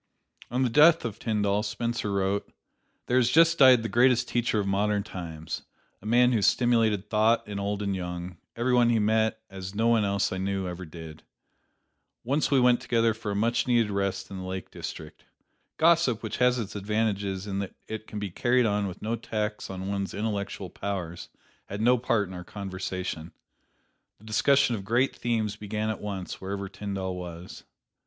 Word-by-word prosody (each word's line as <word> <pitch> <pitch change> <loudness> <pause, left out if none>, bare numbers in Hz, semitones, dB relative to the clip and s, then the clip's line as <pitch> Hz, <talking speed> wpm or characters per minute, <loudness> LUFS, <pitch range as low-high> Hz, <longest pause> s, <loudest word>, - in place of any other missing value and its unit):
On 125 +3 0
the 125 - +2
death 155 +2 +6
of 110 -3 -5
Tyndall, 105 -2 0
Spencer 115 0 -2
wrote: 100 +1 -1 0.5
"There 125 - +1
has 125 -2 +4
just 165 +4 +5
died 130 -4 +7
the - - -1
greatest 125 +1 +3
teacher 120 -2 0
of 100 - -1
modern 100 +1 +1
times: 80 -5 -6 0.4
a 105 - -8
man 125 +2 +5
who 115 -4 +2
stimulated 110 -3 +2
thought 110 +2 +2
in 100 -1 -4
old 100 +1 -2
and 100 -1 -1
young, 90 -1 -5 0.2
every 120 +2 0
one 120 -1 +5
he 115 - +3
met, 110 +1 +1
as 95 0 -8
no 110 +2 +1
one 115 -2 +4
else 100 -1 0
I 95 - -3
ever - - -4
knew 95 -2 -2
did. 80 -1 -10 1.0
Once 140 +5 +1
we 140 - +4
went 125 -1 +4
together 115 -1 +2
for 110 -1 -6
a 100 - -2
much 115 +5 +1
needed 120 -4 +3
rest 100 -1 -1
to - - -12
the 95 - -5
Lake 95 0 -6
District. - - -8 0.5
Gossip, 160 -9 +3
which 110 - -4
has 125 0 +3
its 110 -4 -5
advantages 100 -2 -1
in 100 -1 -3
that 100 -2 -5
it 110 0 -6
can 105 - -7
be 105 -2 -4
carried 125 +6 +2
on 105 -1 +1
with 95 0 -8
no 115 +2 -1
tax 105 -2 -3
on 95 0 -5
one's 100 -1 -3
intellectual 100 -3 -3
powers, 90 -4 -5 0.4
had 100 - -5
no 120 +3 +4
part 115 -4 +1
in 95 - -9
our 90 -1 -7
conversation. 95 -4 -5 0.8
The 110 - -19
discussion 130 +4 +3
of 100 - -6
great 120 +6 +1
themes 110 -4 -1
began 105 +1 -2
at 110 - -6
once 100 -3 -5
wherever 100 +1 -4
Tyndall 95 -2 -4
was. 90 0 -8
105 Hz, 185 wpm, -27 LUFS, 95-115 Hz, 1.0 s, died